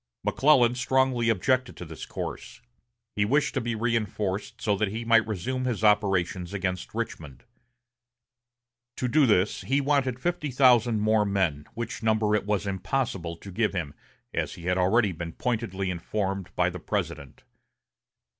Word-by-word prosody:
McClellan 130 -4 +4
strongly 130 -2 +1
objected 125 +5 +1
to 90 - -7
this 80 -1 -8
course. - - -6 0.6
He 105 - +2
wished 140 +8 +1
to 130 - -1
be 120 0 -2
reinforced 110 -2 -2
so 105 -3 +1
that 105 - +1
he 110 +4 -5
might 115 -1 +4
resume 130 +6 -2
his 120 -4 -2
operations 95 -3 +2
against 90 -2 -3
Richmond. 75 -5 -5 1.5
To 125 - -2
do 140 +2 +4
this 105 -2 +2
he 135 +2 +1
wanted 135 -3 +1
fifty 170 0 -2
thousand 120 -4 +4
more 110 0 +3
men, 95 -8 0
which 115 +1 -5
number 110 -1 +2
it 105 -1 0
was 105 -1 0
impossible 95 -4 -2
to 100 - -10
give 110 +3 0
him, 80 -6 -3 0.4
as - - -2
he 85 - -12
had 90 +1 0
already 100 +3 +3
been 85 -1 -6
pointedly 95 -6 -2
informed 95 +2 -3
by - - +2
the - - -7
President. 70 -3 -4
110 Hz, 155 wpm, -27 LUFS, 95-120 Hz, 1.5 s, McClellan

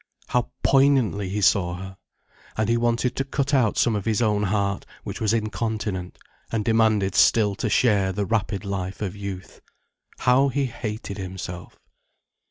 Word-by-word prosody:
How 125 -1 0
poignantly 135 -8 +3
he 105 +2 -2
saw 95 -4 +3
her! 95 +1 -8 0.6
And 110 +1 0
he 115 - +3
wanted 120 +1 0
to 135 - +1
cut 140 +1 -2
out 125 -6 +3
some 115 - +3
of 100 - -3
his 110 -1 +1
own 105 -3 +2
heart, 100 -1 0 0.2
which - - -6
was 110 -2 +2
incontinent, 110 -4 -2 0.3
and 110 -2 -1
demanded 110 -4 +2
still 105 -3 +4
to - - -1
share 100 -6 +3
the 100 +2 -2
rapid 100 -1 -1
life 100 0 -4
of 95 -1 -4
youth. 100 -2 -7 0.6
How 130 +3 +4
he 140 +1 0
hated 110 -4 -5
himself. 90 -2 -7
105 Hz, 160 wpm, -24 LUFS, 100-115 Hz, 0.6 s, still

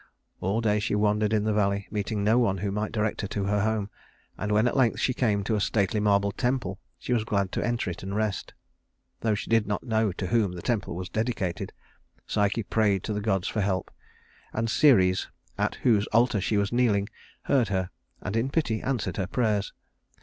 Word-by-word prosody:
All 100 +5 0
day 105 -2 +2
she 105 0 -1
wandered 105 0 +2
in 110 -2 +2
the 110 0 +1
valley, 100 -1 +1
meeting 105 0 -2
no 110 +4 +4
one 100 -6 +2
who 100 +2 -2
might 105 +2 -2
direct 110 -1 -1
her 100 - -3
to 100 +1 -3
her 100 +1 +1
home; 110 -1 -1 0.4
and 105 +1 -3
when 105 +3 +4
at - - -1
length 130 -4 +3
she 130 - +1
came 105 -5 +1
to 110 - -1
a 105 - 0
stately 100 +1 +1
marble 100 -1 +2
temple, 120 -5 -1 0.2
she 125 - -2
was 115 -3 +2
glad 100 -3 0
to - - -2
enter 120 -3 -1
it 85 - -8
and 95 +1 -4
rest. 105 -3 -2 0.6
Though 110 -2 +1
she 105 - -6
did 115 -2 +3
not 105 - -2
know 110 -4 +1
to 95 - -4
whom 105 -3 +1
the 85 - -8
temple 110 -7 -1
was 90 +1 -4
dedicated, 100 -3 -2 0.5
Psyche 105 +2 0
prayed 100 -2 +1
to 110 - -2
the 105 - -2
gods 95 -3 0
for 105 - -1
help; 95 -2 -1 0.6
and 115 0 -1
Ceres, 95 -12 +4 0.3
at - - -1
whose 110 -4 +3
altar 115 -2 +3
she 105 +3 0
was 100 +2 0
kneeling, 110 -5 +2 0.4
heard 125 -5 +2
her, 95 -2 -1 0.3
and 95 +3 -3
in 115 +4 +1
pity 135 -8 0
answered 120 -9 -2
her 95 -3 -1
prayers. 105 -4 0
105 Hz, 210 wpm, -27 LUFS, 100-115 Hz, 0.6 s, no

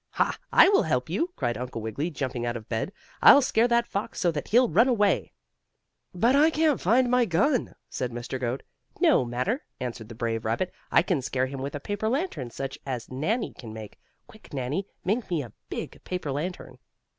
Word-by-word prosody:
"Ha! - - +1 0.2
I - - +8
will 400 0 +5
help - - -1
you!" 340 - 0
cried 120 -1 -2
Uncle 125 -2 -5
Wiggily 110 +9 -3
jumping 130 -5 -3
out 120 0 -1
of 110 - -11
bed. 115 +10 -2 0.3
"I'll 280 - +9
scare 230 -1 +3
that 235 0 +3
fox 205 +2 -4
so 175 - +2
that 150 -2 -4
he'll 245 +3 +5
run 235 - +4
away." 210 -7 +2 0.8
"But 230 +9 +3
I 300 +3 +6
can't 310 -3 +2
find 245 +7 +4
my 250 0 +3
gun," 235 - +1
said 125 -1 -3
Mr. 120 +2 -5
Goat. 125 +1 -2 0.4
"No - - +5
matter," 125 - -2 0.2
answered 115 -3 -5
the 115 - -9
brave 115 -1 -2
rabbit. 115 +12 -1 0.2
"I - - +5
can 175 -6 0
scare 130 0 0
him 135 0 -6
with 140 +2 -4
a - - -3
paper 205 +7 -2
lantern 260 - -2
such 135 +3 -6
as 130 -4 -5
Nannie 200 - -1
can 110 -3 -10
make. 110 -2 -9 0.3
Quick, 220 - -17
Nannie, 140 +9 -2 0.2
make 215 +4 0
me 165 -5 0
a 115 - -11 0.2
big - - -6
paper 180 -6 -3
lantern." 145 -3 -5
150 Hz, 200 wpm, -27 LUFS, -, 0.8 s, I'll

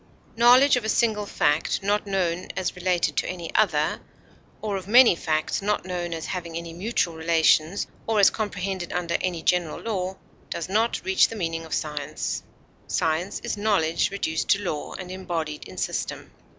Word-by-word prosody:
Knowledge 250 +4 +6
of 245 - -2
a 220 - -2
single 215 -3 +1
fact, 150 +4 +1
not 205 +1 0
known 180 -3 -1
as 185 - -1
related 180 -1 0
to - - +1
any 175 -2 -6
other, 155 -8 +2 0.6
or 210 -2 -2
of 190 -1 -5
many 240 -2 +7
facts 155 0 -1
not 205 -2 -1
known 175 -2 -3
as 165 -1 -4
having 170 -3 -4
any 170 0 -6
mutual 180 -1 -1
relations 160 +2 +2 0.2
or 220 -1 +2
as 200 - +7
comprehended 195 -4 -3
under 170 -1 -1
any 175 -3 -2
general 175 -3 +1
law, 190 -4 -3 0.3
does 170 - -4
not 220 +5 0
reach 380 0 +4
the 225 - -8
meaning 165 -4 -3
of 160 - -7
science; 150 -2 -3 0.5
science 165 +5 -1
is - - -3
knowledge 200 -6 +1
reduced 160 -5 -2
to 200 +1 +3
law 155 -5 -3
and 185 -1 -7
embodied 165 -5 -4
in 95 - -12
system. - - -3
180 Hz, 170 wpm, -25 LUFS, 165-205 Hz, 0.6 s, many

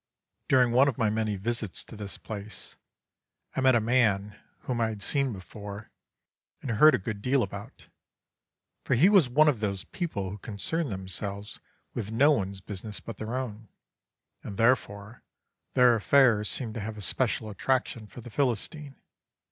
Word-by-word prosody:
"During 125 -2 +4
one 130 +4 +5
of 135 - -1
my 110 -4 +2
many 110 -1 -1
visits 110 0 -2
to - - -12
this 105 -2 -6
place, 110 0 -7 0.8
I - - 0
met 130 -1 +5
a - - +5
man 105 -4 +2 0.3
whom 120 -2 -2
I 115 - +3
had 105 -2 -5
seen 140 +3 0
before 100 +1 -9 0.7
and 130 - -4
heard 150 +8 +7
a - - +1
good 100 +1 -5
deal 130 +2 +2
about, 100 +1 -8 1.0
for - - +1
he 160 +11 +6
was 190 -11 +5
one 150 +5 +5
of 140 -7 +3
those 100 -3 -2
people 100 - -4
who 105 - -7
concern 130 - -2
themselves 100 +1 -5 0.3
with 110 -2 -4
no 140 +7 +5
one's 100 -7 -1
business 100 +2 -6
but 115 - -8
their 110 +3 -4
own, 115 -4 -5 0.8
and, 100 - -7
therefore, 115 -2 +1 0.5
their 125 -1 +6
affairs 115 -2 +4
seem 115 -5 -3
to 115 - -5
have 110 +1 -5
a - - -7
special 110 - 0
attraction 120 0 -1
for 120 - -11
the 120 0 -11
Philistine. 140 - -1
110 Hz, 165 wpm, -28 LUFS, 100-130 Hz, 1.0 s, heard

